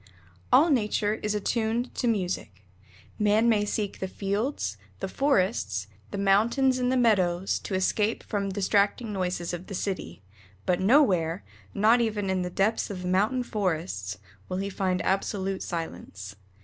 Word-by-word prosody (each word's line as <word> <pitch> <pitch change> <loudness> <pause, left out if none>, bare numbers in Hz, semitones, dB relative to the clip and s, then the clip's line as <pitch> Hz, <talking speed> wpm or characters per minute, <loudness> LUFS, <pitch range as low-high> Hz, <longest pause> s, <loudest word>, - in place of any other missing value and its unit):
All 315 +4 +6
nature 215 -3 +1
is 210 0 -1
attuned 225 +3 -1
to 245 - -1
music. 180 - -2 0.5
Man 210 +2 +3
may 210 -3 +3
seek 205 -1 -3
the 190 - -2
fields, 200 - -2 0.2
the - - -3
forests, 195 - +1 0.2
the - - -5
mountains, 235 +7 +3
and 250 0 +1
the 260 - +2
meadows, 190 -6 +2
to 195 - -4
escape 205 +3 +1
from 200 -2 -2
distracting 205 +3 +1
noises 180 -2 -2
of 175 +1 -6
the 195 - -5
city, 140 - -4 0.4
but 180 - +1
nowhere, 190 - +3 0.3
not 220 +4 +5
even 210 -4 -1
in 185 -1 0
the 180 - -2
depths 195 +5 0
of 185 -3 -5
mountain 210 +8 +1
forests, 170 - -2 0.3
will 185 - -2
he 195 +1 -3
find 185 -1 -1
absolute 195 0 -1
silence. 100 - -6
200 Hz, 150 wpm, -27 LUFS, 185-220 Hz, 0.5 s, All